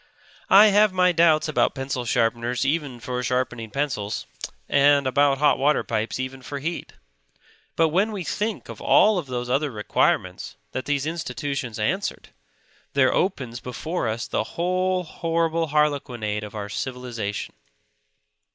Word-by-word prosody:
I 210 +2 +8
have 210 0 +5
my 180 -1 +3
doubts 160 -2 +4
about 155 - +1
pencil 135 -2 -3
sharpeners 120 +2 0
even 140 -4 -1
for 125 +1 -3
sharpening 125 -2 -2
pencils; 120 -6 -2 0.4
and 140 0 +4
about 140 +1 +3
hot 145 0 +3
water 145 +3 +2
pipes 110 +2 -2
even 130 +1 -5
for 140 +2 -6
heat. 165 +5 -5 0.8
But 165 -1 +3
when 195 +7 +1
we 200 -4 -4
think 210 +4 -3
of - - -9
all 210 -4 +4
those 125 -4 -4
other 140 +4 +1
requirements 105 -4 0 0.2
that 130 - -4
these 145 -1 0
institutions 140 -6 -4
answered, 190 - -2 0.6
there 130 -2 +3
opens 130 -11 -1
before 140 +5 -3
us 110 +2 -2
the - - -1
whole 185 +1 +1
horrible 165 0 -1
harlequinade 130 -8 0
of 105 +1 -8
our 105 -1 -4
civilization. 115 -2 -4
140 Hz, 140 wpm, -24 LUFS, 125-165 Hz, 0.8 s, I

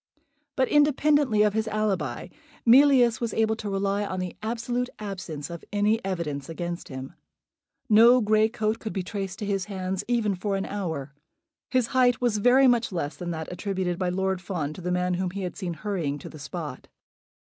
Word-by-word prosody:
But, 260 -1 +2
independently 290 -5 +3
of 210 -1 +2
his 220 0 0
alibi, 215 -3 -1 0.4
Mealyus 245 -2 +6
was 230 -2 -2
able 220 0 +2
to 215 -2 -5
rely 200 +1 0
on 185 -2 -3
the 180 -1 -4
absolute 240 +3 -2
absence 180 -8 -6
of 170 - -7
any 210 +2 +1
evidence 165 -7 -3
against 170 +1 -5
him. 130 -1 -7 0.7
No 235 +3 +7
grey 215 -1 +3
coat 215 0 -1
could 220 - -5
be 190 - -2
traced 195 -1 -5
to 210 - -4
his 195 -2 -1
hands, 190 -2 -3
even 230 -4 +1
for 195 +2 -2
an 195 - -2
hour. 160 -9 -4 0.6
His 255 -2 +2
height 250 -2 +4
was 235 -4 +1
very 250 +5 +5
much 240 -3 +3
less 165 -5 -3
than 175 -1 -6
that 160 -2 -4
attributed 185 -2 -2
by 185 -1 0
Lord 190 0 -1
Fawn 165 -6 -3
to 180 - -10
the 180 +1 -2
man 180 0 +1
whom 180 +1 -1
he 195 +2 -5
had 180 - -4
seen 175 -4 -4
hurrying 170 -8 -2
to - - -9
the 155 - -11
spot. 150 -2 -6
200 Hz, 190 wpm, -26 LUFS, 180-225 Hz, 0.7 s, No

